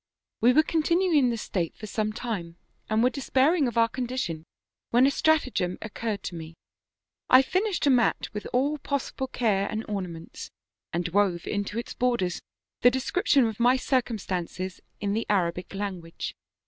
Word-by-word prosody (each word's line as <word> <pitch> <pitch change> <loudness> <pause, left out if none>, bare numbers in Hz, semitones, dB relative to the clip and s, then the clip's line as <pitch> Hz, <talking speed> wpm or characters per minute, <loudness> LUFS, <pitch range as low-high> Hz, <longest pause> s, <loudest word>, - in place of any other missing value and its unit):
"We 240 - +5
were 310 +5 +5
continuing 335 +3 +2
in 255 -3 +3
this 230 -2 -2
state 170 -4 -3
for 215 - -7
some 215 0 -1
time, 195 -7 -5 0.3
and 220 +1 +2
were 250 - +4
despairing 275 +2 +2
of 235 - -4
our 230 0 +5
condition, 235 -10 -4 0.4
when 245 +2 +5
a 275 - +4
stratagem 270 - +1
oc 220 - -8
curred 215 -4 -3
to - - -5
me; 165 -1 -8 0.7
I 255 +1 +8
finished 370 +4 0
a 280 - +5
mat 245 -3 +2
with 210 -1 -5
all 285 +4 +1
possible 270 -1 -3
care 205 -6 +1
and 220 +1 -3
ornaments, 180 -5 -6 0.4
and 175 +1 -1
wove 185 -2 +1
into 205 +1 -3
its 235 - -4
borders 235 -8 0 0.4
the 245 - +8
description 265 +1 +2
of 220 -1 -3
my 245 +2 +5
circumstances 190 - -2 0.2
in 200 -1 -1
the 225 +2 -2
Arabic 180 -3 0
language. 185 -5 -5
225 Hz, 165 wpm, -27 LUFS, 190-260 Hz, 0.7 s, I